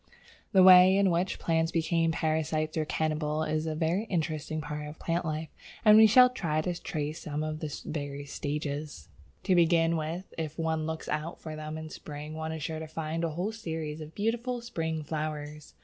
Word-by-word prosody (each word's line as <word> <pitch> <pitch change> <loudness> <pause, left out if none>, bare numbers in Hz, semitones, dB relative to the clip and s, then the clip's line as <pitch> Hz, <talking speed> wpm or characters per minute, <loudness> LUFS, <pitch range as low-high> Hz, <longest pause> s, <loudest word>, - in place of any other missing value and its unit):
The 190 -3 +6
way 185 +1 +9
in 200 -2 +4
which 175 +3 0
plants 165 -1 +1
became 165 0 +1
parasites 155 -1 -1
or 155 -1 0
cannibals 155 0 -1
is 155 +1 -1
a 155 - -2
very 170 +7 0
interesting 155 -5 -2
part 150 0 -5
of 150 +1 -9
plant 170 +1 -1
life, 155 0 -3 0.4
and 210 0 +9
we 220 0 +9
shall 250 +4 +8
try 160 -10 -1
to 175 +2 -2
trace 155 -3 -3
some 150 0 -3
of 155 0 -3
the 155 -2 -4
various 145 -2 -5
stages. 145 - -4 0.3
To 190 - +2
begin 170 -1 +4
with, 165 +4 -4
if 155 -1 -4
one 160 -1 -1
looks 160 0 -5
out 155 +3 -3
for 155 -1 -7
them 155 0 -6
in 160 0 -7
spring 150 +1 -8
one 160 0 -4
is 160 -2 -5
sure 160 +1 -3
to 160 - -6
find 160 +1 -3
a 165 - +1
whole 175 +7 -2
series 160 -7 -5
of 155 +1 -10
beautiful 235 +4 -1
spring 160 -9 -3
flowers. 150 -1 -5
160 Hz, 195 wpm, -29 LUFS, 155-170 Hz, 0.4 s, way